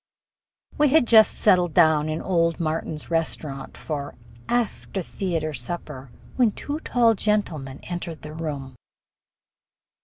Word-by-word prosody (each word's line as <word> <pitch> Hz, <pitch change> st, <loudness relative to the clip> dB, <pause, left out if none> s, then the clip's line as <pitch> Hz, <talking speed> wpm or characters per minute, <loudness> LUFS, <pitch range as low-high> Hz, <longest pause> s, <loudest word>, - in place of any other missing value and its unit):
We 300 Hz, -, +5 dB
had 305 Hz, -2 st, +5 dB
just 220 Hz, -2 st, +6 dB
settled 180 Hz, -5 st, +3 dB
down 160 Hz, -3 st, +4 dB
in 155 Hz, +1 st, -3 dB
old 170 Hz, -2 st, +1 dB
Martin's 160 Hz, -1 st, -3 dB
Restaurant 155 Hz, -4 st, -2 dB
for 145 Hz, -3 st, -5 dB, 0.3 s
after 230 Hz, -5 st, -1 dB
theater 165 Hz, -4 st, -3 dB
supper 135 Hz, 0 st, -6 dB, 0.3 s
when 235 Hz, -5 st, +3 dB
two 295 Hz, +2 st, -5 dB
tall 240 Hz, -6 st, +3 dB
gentlemen 175 Hz, -11 st, -1 dB
entered 175 Hz, -2 st, -6 dB
the 150 Hz, 0 st, -8 dB
room. 145 Hz, -5 st, -5 dB
165 Hz, 120 wpm, -24 LUFS, 150-205 Hz, 0.3 s, just